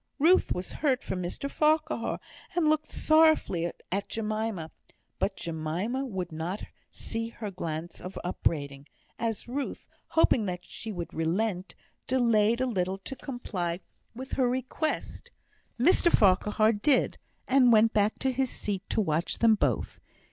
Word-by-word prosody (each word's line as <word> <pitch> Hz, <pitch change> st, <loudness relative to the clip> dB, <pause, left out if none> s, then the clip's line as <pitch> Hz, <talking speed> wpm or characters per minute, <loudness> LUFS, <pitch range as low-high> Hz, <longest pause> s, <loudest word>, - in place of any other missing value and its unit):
Ruth 335 Hz, +6 st, +4 dB
was 180 Hz, +1 st, -2 dB
hurt 270 Hz, -4 st, 0 dB
for -, -, -3 dB
Mr 180 Hz, +9 st, -4 dB
Farquhar, 310 Hz, +2 st, +1 dB, 0.4 s
and 345 Hz, -3 st, +3 dB
looked 310 Hz, 0 st, +2 dB
sorrowfully 310 Hz, -, +3 dB, 0.2 s
at 200 Hz, +2 st, -2 dB
Jemima; 215 Hz, -6 st, -2 dB, 0.5 s
but 195 Hz, -, 0 dB
Jemima 170 Hz, -, -3 dB
would 185 Hz, -6 st, -4 dB
not 165 Hz, +6 st, -4 dB, 0.3 s
see 225 Hz, 0 st, -5 dB
her 220 Hz, -3 st, -6 dB
glance 170 Hz, -2 st, -5 dB
of 180 Hz, +2 st, -7 dB
upbraiding, 145 Hz, -5 st, -2 dB, 0.3 s
as 230 Hz, -1 st, -2 dB
Ruth, 275 Hz, +4 st, -4 dB, 0.2 s
hoping 250 Hz, -9 st, +3 dB
that 180 Hz, -1 st, -4 dB
she 225 Hz, -, -7 dB
would 175 Hz, -4 st, -6 dB
relent, 180 Hz, +2 st, -1 dB, 0.3 s
delayed 235 Hz, -2 st, +3 dB
a -, -, +3 dB
little 190 Hz, -5 st, -1 dB
to 195 Hz, +7 st, -7 dB
comply 185 Hz, -10 st, -4 dB, 0.4 s
with 260 Hz, +2 st, -8 dB
her 255 Hz, -2 st, +2 dB
request. 260 Hz, +5 st, -3 dB, 0.5 s
Mr 340 Hz, +5 st, +4 dB
Farquhar 210 Hz, +2 st, +4 dB
did; 255 Hz, +6 st, +2 dB, 0.3 s
and 255 Hz, -2 st, +5 dB
went 220 Hz, 0 st, +5 dB
back 210 Hz, +1 st, +2 dB
to 265 Hz, -, 0 dB
his 260 Hz, 0 st, 0 dB
seat 200 Hz, -4 st, -3 dB
to -, -, +1 dB
watch 160 Hz, -3 st, 0 dB
them 230 Hz, -1 st, +5 dB
both. 210 Hz, -, 0 dB
215 Hz, 140 wpm, -28 LUFS, 180-260 Hz, 0.5 s, and